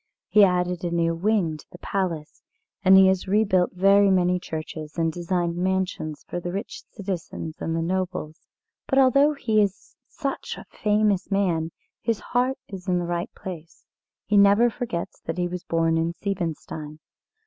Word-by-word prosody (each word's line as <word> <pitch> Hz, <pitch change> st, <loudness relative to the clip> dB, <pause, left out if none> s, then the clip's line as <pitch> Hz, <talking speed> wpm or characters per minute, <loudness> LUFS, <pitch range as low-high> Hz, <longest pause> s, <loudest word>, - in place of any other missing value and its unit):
He 210 Hz, -, +6 dB
added 180 Hz, -2 st, +1 dB
a 175 Hz, -, 0 dB
new 170 Hz, -1 st, +1 dB
wing 175 Hz, -3 st, +1 dB
to -, -, -15 dB
the -, -, -11 dB
Palace, 175 Hz, -6 st, -3 dB, 0.4 s
and 190 Hz, 0 st, +8 dB
he 190 Hz, -, +8 dB
has 190 Hz, -1 st, +2 dB
rebuilt 190 Hz, -3 st, +2 dB
very 195 Hz, +2 st, +5 dB
many 180 Hz, -1 st, +3 dB
churches, 155 Hz, -2 st, -7 dB
and 165 Hz, -1 st, +1 dB
designed 175 Hz, 0 st, -1 dB
mansions 185 Hz, -4 st, -2 dB
for 175 Hz, -, -3 dB
the 175 Hz, 0 st, -4 dB
rich 200 Hz, +5 st, -5 dB
citizens 185 Hz, -5 st, -5 dB
and 165 Hz, -, -1 dB
the 165 Hz, -, 0 dB
nobles. 180 Hz, -3 st, -3 dB, 0.5 s
But 270 Hz, -, +1 dB
although 275 Hz, +3 st, +5 dB
he 225 Hz, -6 st, +2 dB
is 200 Hz, -1 st, -3 dB
such 275 Hz, -4 st, -4 dB
a -, -, -10 dB
famous 210 Hz, -2 st, +1 dB
man 180 Hz, -5 st, +1 dB, 0.3 s
his 230 Hz, -3 st, 0 dB
heart 255 Hz, +2 st, 0 dB
is 190 Hz, -1 st, -9 dB
in 180 Hz, -1 st, +2 dB
the 175 Hz, -, -1 dB
right 175 Hz, 0 st, -2 dB
place. 170 Hz, -3 st, -9 dB, 0.4 s
He 210 Hz, +1 st, +2 dB
never 200 Hz, +4 st, +6 dB
forgets 225 Hz, -9 st, -4 dB
that 165 Hz, -, -3 dB
he 175 Hz, 0 st, 0 dB
was 180 Hz, 0 st, -6 dB
born 165 Hz, 0 st, +1 dB
in 165 Hz, +1 st, 0 dB
Siebenstein. 160 Hz, -6 st, -4 dB
180 Hz, 170 wpm, -25 LUFS, 170-200 Hz, 0.5 s, and